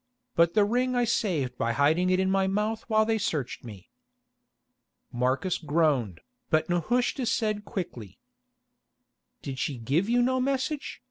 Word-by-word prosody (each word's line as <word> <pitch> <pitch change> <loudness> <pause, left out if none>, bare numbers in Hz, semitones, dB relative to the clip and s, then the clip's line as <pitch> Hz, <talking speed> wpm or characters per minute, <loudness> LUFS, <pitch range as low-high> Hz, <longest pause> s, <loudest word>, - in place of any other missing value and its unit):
But 170 +2 +3
the 210 -2 +5
ring 250 +4 0
I 245 - +3
saved 165 - -1
by 115 0 0
hiding 155 +8 +2
it 185 0 +2
in 190 0 +1
my 195 0 +2
mouth 210 +3 -1
while 220 -1 +3
they 220 0 +1
searched 145 - -3
me." 105 -6 -11 1.2
Marcus 130 +9 0
groaned, 145 - 0 0.3
but 155 0 +2
Nehushta 240 - 0
said 215 -3 0
quickly: 125 - -6 1.3
"Did 135 -2 -5
she 135 -1 -2
give 145 - 0
you 245 +1 +3
no 260 +1 +1
message? 275 +2 -2
185 Hz, 145 wpm, -27 LUFS, 140-225 Hz, 1.3 s, the